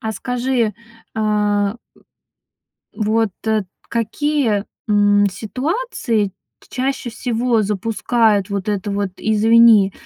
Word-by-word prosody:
А 220 Hz, -3 st, -3 dB
скажи, 245 Hz, -2 st, -1 dB, 0.4 s
а. 210 Hz, -1 st, 0 dB, 1.2 s
Вот, 220 Hz, 0 st, +1 dB, 0.2 s
э, 220 Hz, -1 st, +2 dB, 0.3 s
какие, 235 Hz, -1 st, 0 dB, 0.2 s
м, 205 Hz, -1 st, +4 dB
ситуации 245 Hz, -, -2 dB, 0.3 s
т -, -, -22 dB
чаще 260 Hz, -1 st, -2 dB
всего 235 Hz, -1 st, 0 dB
запускают 210 Hz, 0 st, +1 dB
вот 200 Hz, 0 st, -3 dB
это 205 Hz, -1 st, -2 dB
вот 200 Hz, -1 st, -1 dB
"извини"? 220 Hz, -2 st, +5 dB
220 Hz, 95 wpm, -19 LUFS, 205-235 Hz, 1.2 s, извини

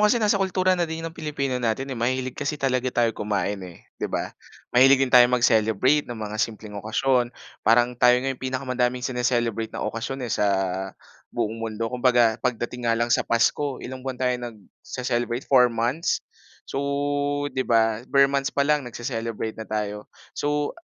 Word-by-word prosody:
kasi 210 Hz, +2 st, +4 dB
nasa 210 Hz, -3 st, +2 dB
kultura 185 Hz, -1 st, +2 dB
na 175 Hz, -2 st, 0 dB
din 160 Hz, 0 st, -5 dB
'yon 165 Hz, -, -5 dB
ng -, -, -25 dB
Pilipino 140 Hz, -5 st, -2 dB
natin, 125 Hz, +4 st, -1 dB
eh, 125 Hz, -, -5 dB
mahilig 130 Hz, +2 st, -1 dB
kasi 145 Hz, +1 st, -3 dB
talaga 130 Hz, -2 st, 0 dB
tayo 120 Hz, -2 st, +1 dB
kumain, 105 Hz, -2 st, -2 dB
eh, 90 Hz, -2 st, -11 dB, 0.2 s
di -, -, -1 dB
ba? -, -, -3 dB, 0.4 s
Mahilig 135 Hz, +2 st, +7 dB
din 125 Hz, -, -6 dB
tayo 125 Hz, -1 st, +8 dB
mag-celebrate 125 Hz, +3 st, +3 dB
ng 120 Hz, -, -5 dB
mga 110 Hz, 0 st, -4 dB
simpleng 110 Hz, -1 st, -3 dB
okasyon 120 Hz, +3 st, +1 dB, 0.3 s
parang 120 Hz, +2 st, +4 dB
tayo 125 Hz, 0 st, +6 dB
nga 135 Hz, -, 0 dB
yung 130 Hz, -, -13 dB
pinakamadaming 125 Hz, -1 st, -1 dB
sine-celebrate 120 Hz, -3 st, 0 dB
na -, -, -3 dB
okasyon, 120 Hz, +4 st, -4 dB
eh, 115 Hz, -, -3 dB
sa 105 Hz, -, +1 dB, 0.8 s
buong 110 Hz, -, -2 dB
mundo. 115 Hz, 0 st, -3 dB
Kumbaga 120 Hz, -3 st, +3 dB
pagdating 120 Hz, 0 st, -2 dB
nga 115 Hz, -, +3 dB
lang 120 Hz, +1 st, +1 dB
sa -, -, +4 dB
Pasko 130 Hz, +4 st, +1 dB
ilang 130 Hz, +1 st, -6 dB
buwan 130 Hz, 0 st, -5 dB
tayo 125 Hz, 0 st, +1 dB
nagce-celebrate, 120 Hz, +2 st, -4 dB
4 125 Hz, -2 st, +5 dB
months? 120 Hz, +7 st, -1 dB, 0.4 s
So, 135 Hz, -, -4 dB, 0.7 s
di 130 Hz, -, -2 dB
ba, 115 Hz, -3 st, +2 dB
ber 140 Hz, 0 st, +5 dB
months 140 Hz, 0 st, 0 dB
pa 140 Hz, -, 0 dB
lang 145 Hz, -3 st, +1 dB
nagcee-celebrate 115 Hz, -2 st, -4 dB
na 110 Hz, -, -8 dB
tayo. 105 Hz, -1 st, -3 dB, 0.2 s
So, 145 Hz, 0 st, -1 dB
125 Hz, 175 wpm, -24 LUFS, 115-135 Hz, 0.8 s, tayo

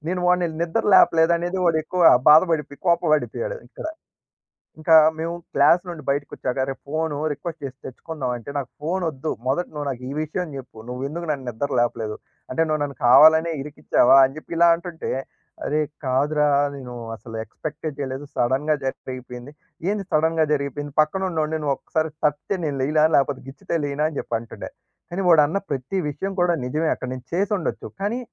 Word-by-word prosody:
నేను 180 Hz, +1 st, -1 dB
వాడిని 180 Hz, 0 st, +3 dB, 0.2 s
నిద్దర 170 Hz, +7 st, -1 dB
లేపలేదనేది 170 Hz, +1 st, +4 dB
వాడెక్కువ 165 Hz, +2 st, +1 dB, 0.3 s
బాధపడిపోయి, 155 Hz, -3 st, +4 dB
కోపబడిపోయాడు 170 Hz, -, +1 dB
ఇక్కడ. -, -, -10 dB, 1.0 s
ఇంకా 160 Hz, +1 st, +2 dB, 0.2 s
మేము 165 Hz, +1 st, -3 dB, 0.2 s
క్లాస్ 150 Hz, +5 st, +5 dB
నుండి 170 Hz, -3 st, -7 dB
బైటకొచ్చాక, 140 Hz, -2 st, -2 dB
"అరే! 135 Hz, +1 st, -2 dB
ఫోను 155 Hz, +1 st, -2 dB
రిక్వెస్ట్ 160 Hz, +3 st, -6 dB
జేసి 135 Hz, -2 st, -5 dB
తెచ్చుకుందాం." 130 Hz, -1 st, -5 dB
అంటే, 120 Hz, -, -10 dB
"నాకు 135 Hz, -3 st, -3 dB
ఫోనొద్దు, 160 Hz, -3 st, -2 dB, 0.2 s
మొదట 145 Hz, +7 st, 0 dB
నువ్వు 150 Hz, -1 st, -4 dB
నాకీ 130 Hz, -1 st, -5 dB
విషయం 165 Hz, +4 st, -3 dB
జెప్పు, 130 Hz, -4 st, -10 dB
నువ్వేందుకు 140 Hz, +7 st, -4 dB
నన్ను 135 Hz, -3 st, -4 dB
నిద్దర 120 Hz, +5 st, -3 dB
లేపలేదు? 115 Hz, -3 st, -1 dB, 0.4 s
అంటే, 145 Hz, -, 0 dB
నువ్వు 155 Hz, -1 st, 0 dB
నన్ను 140 Hz, -1 st, -4 dB
కావాలనే 160 Hz, +6 st, +7 dB
ఇరికిచ్చావా?" 140 Hz, -2 st, +3 dB
అని 135 Hz, +1 st, +1 dB
చెప్పి 155 Hz, -, -8 dB
ఇలా 170 Hz, 0 st, +6 dB
అంటుంటే, 170 Hz, -1 st, -6 dB, 0.5 s
"అరే! 155 Hz, +1 st, +1 dB, 0.2 s
కాదురా 145 Hz, +3 st, +2 dB, 0.3 s
నేను 125 Hz, -3 st, -8 dB, 0.2 s
అసలు 115 Hz, 0 st, -9 dB
ఎక్స్పెక్టే 155 Hz, +5 st, -6 dB
జేయలేదు, 135 Hz, +1 st, -4 dB
సడెన్‌గా 135 Hz, +5 st, +1 dB
జరిగిపోయింది." 130 Hz, 0 st, -6 dB, 0.4 s
"ఏంది 205 Hz, -1 st, -2 dB
సడెన్‌గా 160 Hz, +1 st, +2 dB
జరిగిపోయింది? 145 Hz, 0 st, -3 dB
పక్కనున్నోడిని 160 Hz, -2 st, -1 dB
నువ్వొక్కసారి 155 Hz, +3 st, -1 dB
తట్టితే 150 Hz, +6 st, 0 dB
నేను 140 Hz, -3 st, -2 dB
లేయల? 155 Hz, +3 st, +3 dB
లేపోతే 140 Hz, -1 st, 0 dB
గిచ్చితే 140 Hz, +5 st, -3 dB
లేయనా?" 145 Hz, +1 st, -1 dB
అని 150 Hz, -, -8 dB
జెప్పంటుండే. 115 Hz, 0 st, -5 dB, 0.4 s
కానీ 190 Hz, +3 st, -2 dB
వాడన్న 155 Hz, +1 st, +5 dB
ప్రతి 135 Hz, +7 st, -3 dB
విషయం 190 Hz, +8 st, -4 dB
కూడా 175 Hz, -1 st, +3 dB
నిజమే, 155 Hz, +5 st, -1 dB
అక్కడ -, -, -7 dB
నేను 130 Hz, 0 st, -11 dB
చేసుండొచ్చు, 195 Hz, -1 st, -1 dB
కానీ, 210 Hz, +5 st, -1 dB
150 Hz, 150 wpm, -23 LUFS, 135-165 Hz, 1.0 s, కావాలనే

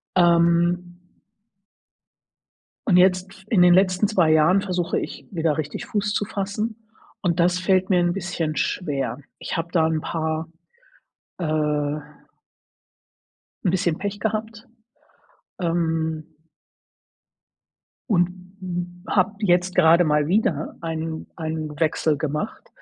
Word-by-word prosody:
Ähm 175 Hz, 0 st, +3 dB, 1.9 s
Und 190 Hz, -7 st, +4 dB
jetzt, 185 Hz, +1 st, +4 dB
f 190 Hz, -, -17 dB
in 190 Hz, -6 st, +4 dB
den 180 Hz, 0 st, +7 dB
letzten 185 Hz, +2 st, +3 dB
2 175 Hz, -7 st, +3 dB
Jahren, 160 Hz, +5 st, +5 dB
versuche 180 Hz, -3 st, -1 dB
ich, -, -, -6 dB
wieder 160 Hz, -5 st, 0 dB
richtig 150 Hz, -2 st, -4 dB
Fuß 205 Hz, -1 st, -1 dB
zu -, -, 0 dB
fassen, 210 Hz, +2 st, -3 dB, 0.4 s
und 175 Hz, -3 st, 0 dB
das 180 Hz, +1 st, +2 dB
fällt 185 Hz, +1 st, +2 dB
mir 180 Hz, -, +4 dB
'n 175 Hz, 0 st, +2 dB
bisschen 175 Hz, -5 st, -3 dB
schwer. 140 Hz, -6 st, -2 dB, 0.2 s
Ich -, -, -4 dB
habe 165 Hz, 0 st, -2 dB
da 160 Hz, -3 st, +3 dB
'n 160 Hz, -1 st, 0 dB
paar, 160 Hz, 0 st, -3 dB, 0.9 s
äh 150 Hz, -3 st, 0 dB, 1.7 s
'n 180 Hz, -, +3 dB
bisschen 175 Hz, -3 st, 0 dB
Pech 205 Hz, 0 st, -4 dB
gehabt, 220 Hz, +1 st, -3 dB, 1.0 s
ähm 160 Hz, -2 st, -1 dB, 1.8 s
und 175 Hz, -4 st, +3 dB, 0.3 s
m 175 Hz, -1 st, -5 dB
habe 205 Hz, +2 st, +2 dB
jetzt 180 Hz, -2 st, +2 dB
gerade 170 Hz, 0 st, +6 dB
mal 150 Hz, -1 st, +2 dB
wieder 180 Hz, -5 st, 0 dB
einen 160 Hz, -1 st, -4 dB
einen 155 Hz, -2 st, -4 dB
Wechsel 160 Hz, -1 st, +1 dB
gemacht 155 Hz, -, -4 dB
175 Hz, 120 wpm, -23 LUFS, 160-185 Hz, 1.9 s, den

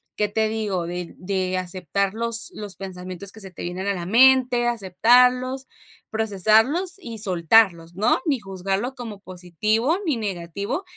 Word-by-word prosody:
¿qué 210 Hz, -, 0 dB
te 220 Hz, +1 st, 0 dB
digo? 205 Hz, -6 st, -2 dB
De 175 Hz, 0 st, -6 dB
de 185 Hz, -1 st, -2 dB
aceptar 185 Hz, +2 st, -2 dB
los 230 Hz, 0 st, 0 dB
los 205 Hz, -2 st, -4 dB
pensamientos 185 Hz, 0 st, -7 dB
que 220 Hz, -, -13 dB
se 190 Hz, -2 st, -6 dB
te -, -, -9 dB
vienen 180 Hz, +3 st, -4 dB
a 200 Hz, -, +1 dB
la 175 Hz, -2 st, -5 dB
mente. 245 Hz, +2 st, +4 dB
Aceptarlos, 250 Hz, +5 st, +2 dB, 0.4 s
procesarlos 220 Hz, -, +2 dB
y 230 Hz, -, -6 dB
soltarlos, 175 Hz, -2 st, +3 dB
¿no? 210 Hz, +5 st, +2 dB
Ni 280 Hz, -6 st, +1 dB
juzgarlo 195 Hz, +6 st, -3 dB
como 225 Hz, -5 st, -8 dB
positivo, 210 Hz, -, -1 dB
ni 295 Hz, -7 st, 0 dB
negativo. 200 Hz, -, -4 dB
205 Hz, 150 wpm, -23 LUFS, 185-235 Hz, 0.4 s, mente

